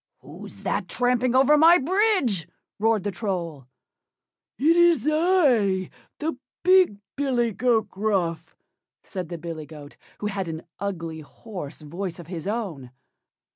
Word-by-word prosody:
"WHO'S - - -12
THAT - - -1
tramping 250 0 +1
over 280 +3 +5
my 335 +3 +8
bridge?" 350 - +1 0.3
roared 220 -2 +2
the 205 - -2
Troll. 170 - -4 0.9
"IT'S 335 +2 +4
I! 280 - +2 0.3
THE 310 -3 -3 0.2
BIG 365 - +5 0.2
BILLY 250 -5 +1
GOAT 225 0 +1
GRUFF," 175 -6 -2 0.5
said 185 -4 -6
the 170 - -5
billy 160 -2 -7
goat, 145 -1 -12 0.2
who - - -6
had 195 -3 -2
an 160 0 -5 0.2
ugly 170 -5 -4
hoarse 155 -1 -9
voice 170 +3 -5
of 175 - -10
his 170 +1 -6
own. 195 - -4
205 Hz, 130 wpm, -25 LUFS, 170-270 Hz, 0.9 s, my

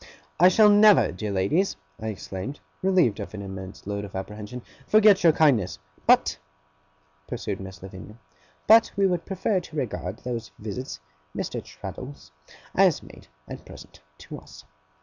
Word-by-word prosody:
'I 180 - +8
shall 210 +3 +6
never, 205 0 +6
dear 105 +3 -5
ladies,' 100 - +1 0.2
I 110 - -5
exclaimed, 105 +5 -6 0.2
relieved 180 - +2
of 105 +1 -6
an 100 - -6
immense 95 -1 -8
load 100 0 -3
of 100 -2 -9
apprehension, 105 +5 -7 0.2
'forget 210 -3 +5
your 165 - +7
kindness!' 130 - +2 0.3
'But,' - - +4 0.9
pursued - - -4
Miss 95 -1 -10
Lavinia, 95 +3 -10 0.5
'but, 225 +1 +6
we 200 - +3
would 180 -3 0
prefer 195 +1 0
to 170 -3 -12
regard 110 -8 -3
those 120 -2 -5
visits, 110 - -6 0.4
Mr. - - -3
Traddles, 135 - -9 0.4
as - - +3
made, - - -15 0.2
at - - -8
present, - - -13 0.2
to - - -9
us. - - -15
120 Hz, 150 wpm, -25 LUFS, -, 0.9 s, I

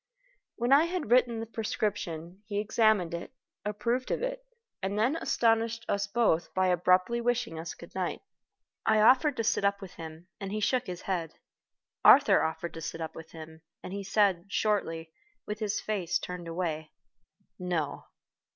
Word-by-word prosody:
When 240 +2 +2
I 295 +4 +6
had 345 -9 -3
written 245 -2 +4
the 225 - -3
prescription, 200 -6 -3
he 205 -2 -3
examined 215 -4 +2
it, 170 +9 -6 0.3
approved 235 +5 -1
of - - -1
it, - - -3 0.4
and 195 +2 -2
then 240 +8 +2
astonished 230 -6 +1
us 200 0 0
both 200 -7 +1
by 185 0 +3
abruptly 185 +6 +3
wishing 245 -8 -1
us 165 0 -6
good 170 - -13
night. 185 - -3 0.6
I 220 0 +3
offered 260 +5 +5
to 230 - 0
sit 215 - +1
up 200 0 +2
with 190 -3 -9
him, 160 +1 -9
and 195 -1 -5
he 215 - -2
shook 250 +4 +1
his 180 -1 -6
head. 175 -4 -2 0.7
Arthur - - +7
offered 160 +1 -2
to 165 - -7
sit 165 - -5
up 160 -1 -4
with 160 0 -10
him, 160 0 -10 0.2
and 185 - -6
he 200 0 -4
said, 195 -3 +2
shortly, 165 -6 -1 0.3
with 210 0 -4
his 215 -2 -1
face 190 -6 -1
turned 180 -1 -6
away, 165 -2 -3 0.7
"No." 170 -5 -2
200 Hz, 170 wpm, -29 LUFS, 170-225 Hz, 0.7 s, Arthur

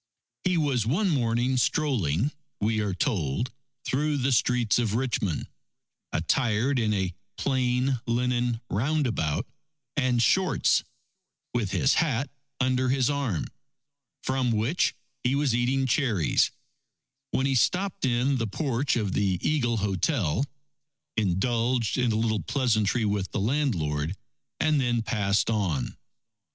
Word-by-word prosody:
He 185 -2 +2
was 140 -7 +1
one 170 - +1
morning 125 -2 +1
strolling, 125 - +1 0.3
we 110 +1 +1
are 100 -3 -1
told, 100 - -1 0.3
through 145 +2 0
the 135 0 +1
streets 120 -1 +2
of 110 -3 0
Richmond, 115 - -1 0.6
attired 120 - +1
in 110 -2 +1
a 95 -3 0 0.2
plain 130 -1 +1
linen 120 0 0
roundabout 120 - 0 0.5
and 130 -4 +2
shorts, 185 +9 +3 0.7
with 120 -5 0
his 135 +7 +2
hat 135 -4 0 0.3
under 130 0 +1
his 130 +1 +2
arm, 135 - -1 0.8
from 130 -1 0
which 115 +10 +1 0.3
he 125 +2 +2
was 140 -3 +1
eating 125 +3 +1
cherries, 115 - +2 0.8
when 130 - 0
he 135 - +2
stopped 185 - +1
in 130 +2 +2
the 115 -2 -1
porch 135 +3 0
of 105 -5 -1
the 95 -3 +1
Eagle 120 -7 +1
Hotel, 100 - 0 0.7
indulged 115 +4 +1
in 125 -2 +2
a - - 0
little 110 -2 +1
pleasantry 110 - +1
with 100 -2 -1
the - - -3
landlord, 95 - 0 0.4
and 155 -3 +3
then 120 -2 +1
passed 105 -2 +1
on. 90 - -1
120 Hz, 125 wpm, -27 LUFS, 105-135 Hz, 0.8 s, shorts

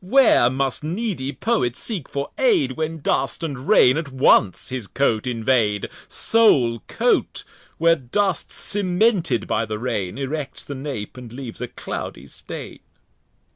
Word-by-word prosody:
where 220 - +5
must 135 +1 -1
needy 170 - -2
Poet 135 - 0
seek 180 - -4
for 140 0 -4
Aid, 420 - +3
When 160 0 -4
Dust 135 +4 0
and 140 -4 -5
Rain 140 -10 +6
at 160 -4 -4
once 130 -7 +3
his 125 -5 -5
Coat 120 -3 0
invade; 115 -4 +1 0.2
Sole 135 - +3
Coat, - - 0 0.3
where 165 0 +4
Dust 185 +9 -1
cemented 185 - +1
by 110 - 0
the 110 0 -3
Rain, 105 -5 -3
Erects 140 +1 -4
the 140 - -6
Nap, 130 -6 -6
and 125 -3 -9
leaves 125 -2 -7
a 125 - -2
cloudy - - -6
Stain. - - -8
135 Hz, 140 wpm, -22 LUFS, 120-175 Hz, 0.3 s, Rain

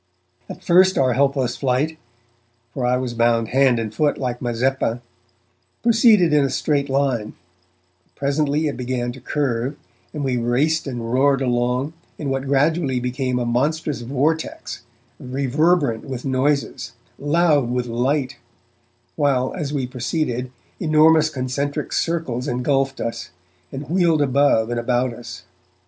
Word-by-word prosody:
At - - -9
first 185 +2 +4
our 130 -2 +3
helpless 135 -2 +1
flight, 140 +5 -1 0.7
for 125 -3 -1
I 125 +1 +2
was 125 -2 -3
bound 115 -1 +2
hand 130 -1 +3
and 110 -2 -3
foot 145 +6 +1
like 125 -2 -3
Mazeppa, 120 0 0 0.8
proceeded 225 -7 +5
in 150 -1 +4
a 135 - +1
straight 140 +1 0
line, 135 -5 0 0.7
but - - -41
presently 145 +2 0
it 145 - -1
began 125 -1 -2
to 130 +1 -12
curve, 130 0 -2 0.3
and 150 -2 -4
we 130 -2 0
raced 140 +7 +1
and 120 -3 -4
roared 135 +1 +3
along, 125 +3 0 0.2
in 140 -3 -3
what 135 0 -2
gradually 140 -1 +1
became 125 +1 -2
a 125 - -1
monstrous 140 +4 -1
vortex, 140 +6 -2 0.4
reverberant 140 0 0
with 130 -2 -6
noises, 140 +2 -1 0.3
loud 145 -3 +2
with 125 0 -1
light, 130 +2 -1 0.8
while, 135 -4 +1
as 150 -6 -3
we 140 -3 -1
proceeded, 125 0 -2 0.3
enormous 155 -1 +4
concentric 140 +2 -3
circles 160 -7 -1
engulfed 135 +2 0
us, 115 - -4 0.4
and 140 +1 -6
wheeled 170 -3 +2
above 135 -4 +2
and 120 - -1
about 125 +1 0
us. 120 0 -10
135 Hz, 135 wpm, -21 LUFS, 125-150 Hz, 0.8 s, proceeded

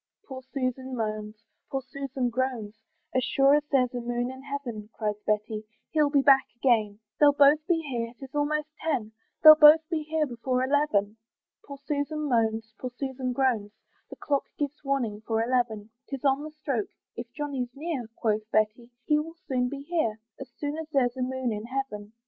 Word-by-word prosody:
Poor 260 -1 -7
Susan 260 -1 -2
moans, 215 -2 -3 0.3
poor 270 -1 -2
Susan 270 -2 -3
groans, 240 -4 -2 0.4
"As 255 - +2
sure 275 +1 +4
as 295 0 +4
there's 255 -3 +3
a 245 - -3
moon 240 +1 -2
in 260 0 -10
heaven," 260 -7 -6
Cries 210 -1 -3
Betty, 215 0 -1 0.3
"he'll 300 -2 +3
be 285 -1 +3
back 270 -1 +6
again; 220 -5 +2 0.2
"They'll 290 -1 +7
both 285 +1 +6
be 330 -2 +2
here, 235 -3 -3
'tis 270 -1 -11
almost 295 +1 0
ten, 255 -9 -1 0.3
"They'll 310 -1 +13
both 310 +1 +7
be 320 -2 0
here 310 0 0
before 255 0 -1
eleven." 260 -7 +1 0.5
Poor 280 - -9
Susan 295 +1 -2
moans, 225 -3 0
poor 255 - -4
Susan 265 -2 -3
groans, 240 -5 0 0.4
The - - -9
clock 280 -2 -1
gives 290 0 -3
warning 245 -7 -1
for 225 0 0
eleven; 230 -3 -1 0.2
'Tis 275 -1 -6
on 270 +1 +3
the 305 - -6
stroke 275 -8 -3 0.3
"If 235 0 -7
Johnny's 280 -5 -3
near," 285 -5 -4
Quoth 215 -1 -1
Betty 215 +3 0 0.2
"he 300 0 +3
will 325 +2 -6
soon 250 -2 0
be 280 +1 -6
here, 285 -9 -1 0.2
"As 270 -2 -8
sure 295 +1 -3
as 320 -1 -7
there's 250 -3 +2
a 260 - -4
moon 255 -1 -1
in 210 +1 -5
heaven." 230 -5 -4
260 Hz, 180 wpm, -27 LUFS, 230-285 Hz, 0.5 s, They'll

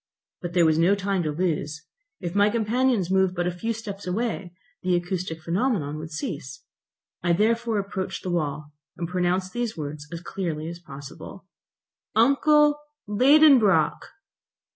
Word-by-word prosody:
But 175 -2 -5
there 175 -2 +4
was 160 0 +3
no 180 +4 +4
time 195 -1 -1
to 155 -3 -1
lose. 150 -2 -2 0.3
If 175 -3 -4
my 205 +1 +4
companions 230 -3 +1
moved 190 -1 +2
but 175 -1 -1
a 180 - 0
few 200 +7 -3
steps 210 -4 -6
away, 195 -2 -2 0.3
the 180 -1 +1
acoustic 175 -1 -3
phenomenon 170 - -1
would 160 +1 -7
cease. 155 -2 -6 0.6
I 175 0 +2
therefore 225 +3 +1
approached 195 -1 -3
the 185 - -3
wall, 150 -3 -2 0.3
and 170 - -3
pronounced 180 +1 0
these 240 -4 -2
words 150 -1 -6
as 170 -1 -6
clearly 165 -4 -4
as 170 0 -8
possible: 140 -4 -10 0.7
"Uncle 295 +5 +4 0.3
Liedenbrock!" 255 -1 +5
185 Hz, 145 wpm, -25 LUFS, 165-220 Hz, 0.7 s, Liedenbrock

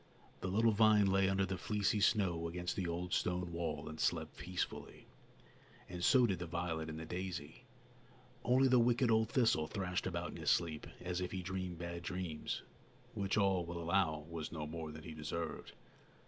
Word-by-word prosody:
The - - -3
little 110 +5 +4
vine 105 -1 +5
lay 95 0 +3
under 95 0 +2
the 95 -1 -3
fleecy 105 +1 +1
snow 90 -6 +2
against 90 +1 -3
the 95 -3 -1
old 85 +1 -3
stone 90 -1 0
wall 85 0 -3
and 80 - -7
slept - - 0
peacefully, 90 -1 -4 0.8
and 90 -1 -6
so 130 +3 +6
did 95 -6 0
the 90 - -4
violet 80 -2 -2
and 80 - -5
the 80 - -6
daisy. 90 -3 -5 0.8
Only 130 +3 +5
the 125 -1 +5
wicked 120 0 +3
old 110 0 +3
thistle 115 -11 +3
thrashed 90 -1 -2
about - - -3
in - - -8
his - - -1
sleep 80 -3 +1
as 90 0 -2
if 90 - -3
he 95 -1 -3
dreamed 95 -1 -3
bad 85 0 -5
dreams, 90 -3 -3 0.5
which, 100 0 -1
all 95 -3 +3
will 85 +1 -5
allow, 80 -3 +1
was 80 -2 -5
no 80 -2 -4
more 80 0 -5
than 80 0 -9
he 80 - -7
deserved. 80 +2 -4
90 Hz, 185 wpm, -36 LUFS, 85-100 Hz, 0.8 s, so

